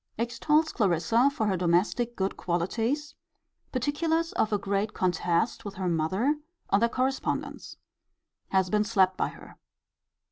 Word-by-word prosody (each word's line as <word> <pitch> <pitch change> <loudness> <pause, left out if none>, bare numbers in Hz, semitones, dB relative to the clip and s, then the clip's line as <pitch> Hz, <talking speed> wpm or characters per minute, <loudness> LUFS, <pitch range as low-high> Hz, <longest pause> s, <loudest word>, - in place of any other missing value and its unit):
Extols 300 +7 +1
Clarissa 225 - +3
for 255 -6 -2
her 200 -2 +1
domestic 185 +7 +1
good 190 0 -1
qualities. 230 - -1 0.6
Particulars 320 +6 0
of 220 - +1
a 205 - +2
great 200 +1 -2
contest 180 +3 0
with 205 -2 -7
her 185 -1 -2
mother, 185 - +1 0.3
on 200 - +5
their 235 +1 +3
correspondence. 260 +2 -2 0.7
Has 190 -1 +1
been 210 0 +3
slapt 190 -4 +3
by - - 0
her. - - -13
215 Hz, 135 wpm, -28 LUFS, 185-255 Hz, 0.7 s, on